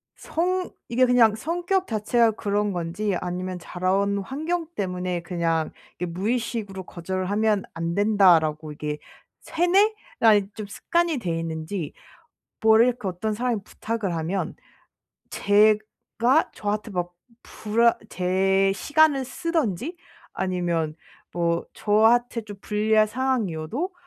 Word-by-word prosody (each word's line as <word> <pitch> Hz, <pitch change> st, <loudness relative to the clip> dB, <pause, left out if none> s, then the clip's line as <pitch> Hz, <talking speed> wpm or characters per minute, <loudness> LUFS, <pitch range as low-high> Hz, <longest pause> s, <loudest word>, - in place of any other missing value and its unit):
성 365 Hz, +2 st, -1 dB, 0.2 s
이게 255 Hz, +2 st, +4 dB
그냥 235 Hz, -4 st, +5 dB
성격 350 Hz, -, -1 dB
자체가 225 Hz, +1 st, +2 dB
그런 205 Hz, -1 st, -1 dB
건지 180 Hz, +4 st, -2 dB
아니면 180 Hz, 0 st, -4 dB
자라 185 Hz, +2 st, -2 dB
온 200 Hz, +1 st, +1 dB
환경 315 Hz, -, -3 dB
때문에 180 Hz, -2 st, -2 dB
그냥 165 Hz, -3 st, -1 dB, 0.3 s
이렇게 175 Hz, -1 st, -3 dB
무의식으로 210 Hz, -1 st, -2 dB
'거절을 185 Hz, +2 st, -4 dB
하면 210 Hz, -1 st, +2 dB
안 165 Hz, +1 st, -3 dB
된다.'라고 170 Hz, -7 st, +3 dB
이게 150 Hz, 0 st, -4 dB, 0.4 s
세뇌가 360 Hz, -, +2 dB
좀 215 Hz, -2 st, -6 dB
습관이 340 Hz, +9 st, 0 dB
돼 175 Hz, -9 st, -2 dB
있는지 160 Hz, +1 st, -4 dB, 0.7 s
뭐 220 Hz, 0 st, +6 dB
이렇게 245 Hz, -3 st, +2 dB
어떤 210 Hz, +4 st, -2 dB
사람이 235 Hz, -2 st, -1 dB
부탁을 215 Hz, -4 st, -3 dB
하면 170 Hz, +5 st, -2 dB, 0.8 s
제가 215 Hz, +6 st, +2 dB
저한테 210 Hz, +1 st, -3 dB
막 175 Hz, -2 st, -3 dB, 0.3 s
불안 230 Hz, +2 st, +2 dB, 0.2 s
제 190 Hz, +2 st, +2 dB
시간을 290 Hz, +3 st, +3 dB
쓰든지 310 Hz, -, -2 dB, 0.4 s
아니면 175 Hz, -4 st, -1 dB, 0.4 s
뭐 170 Hz, -1 st, 0 dB
저한테 230 Hz, +3 st, +3 dB
좀 205 Hz, -2 st, -10 dB
불리한 215 Hz, +1 st, +2 dB
상황이어도 245 Hz, -, -2 dB
210 Hz, 255 characters per minute, -24 LUFS, 180-240 Hz, 0.8 s, 뭐